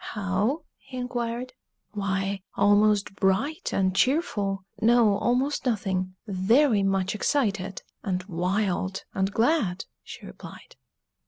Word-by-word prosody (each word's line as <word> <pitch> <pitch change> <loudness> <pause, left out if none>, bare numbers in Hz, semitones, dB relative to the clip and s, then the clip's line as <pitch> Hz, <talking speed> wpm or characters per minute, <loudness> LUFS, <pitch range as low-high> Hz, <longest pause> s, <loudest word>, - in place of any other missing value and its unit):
"How?" 205 +8 0 0.2
he 260 -1 -10
inquired. 245 0 -3 0.4
"Why, 195 -1 -2
almost 205 0 +3
bright 210 - 0
and 185 -1 +1
cheerful 205 - +1 0.2
no, 230 -2 +5
almost 260 +4 0
nothing 190 -6 -1
very 215 +4 +3
much 195 -1 +1
excited, 200 -6 -1 0.2
and 185 -2 -2
wild, 190 +1 -1
and 195 +1 0
glad!" 225 - +1 0.2
she - - -11
replied. - - -12
205 Hz, 105 wpm, -26 LUFS, 190-245 Hz, 0.4 s, no